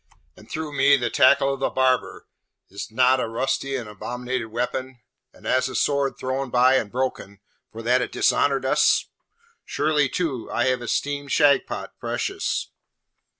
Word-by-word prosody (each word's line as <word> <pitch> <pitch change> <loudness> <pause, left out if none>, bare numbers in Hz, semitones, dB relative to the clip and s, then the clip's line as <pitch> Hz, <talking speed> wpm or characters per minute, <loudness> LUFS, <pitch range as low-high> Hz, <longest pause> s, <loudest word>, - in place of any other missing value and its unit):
And 110 - -17
through 155 -2 -5
me 140 +1 +5
the 120 -2 -2
tackle 135 +1 +4
of 135 - -6
the 135 - 0
barber, 130 -1 0 0.5
is't 100 +2 -7
not 130 +3 +3
a - - -1
rusty 135 +3 -2
and 120 -4 -4
abominated 125 +3 -4
weapon, 125 +2 -4 0.3
and - - -19
as 130 0 +1
a - - -7
sword 140 -1 +1
thrown 130 +1 -3
by 125 +2 +4
and 105 - -3
broken, 125 -6 -3 0.3
for 115 +1 -9
that 125 +2 +3
it - - -3
dishonoured 140 -2 +1
us? 130 - +3 0.5
Surely, 150 -2 +1
too, 140 -9 -3
I 120 - +1
have 130 -1 0
esteemed 140 +3 -2
Shagpat 145 -2 +1
precious.' - - -3
130 Hz, 155 wpm, -23 LUFS, 125-135 Hz, 0.5 s, me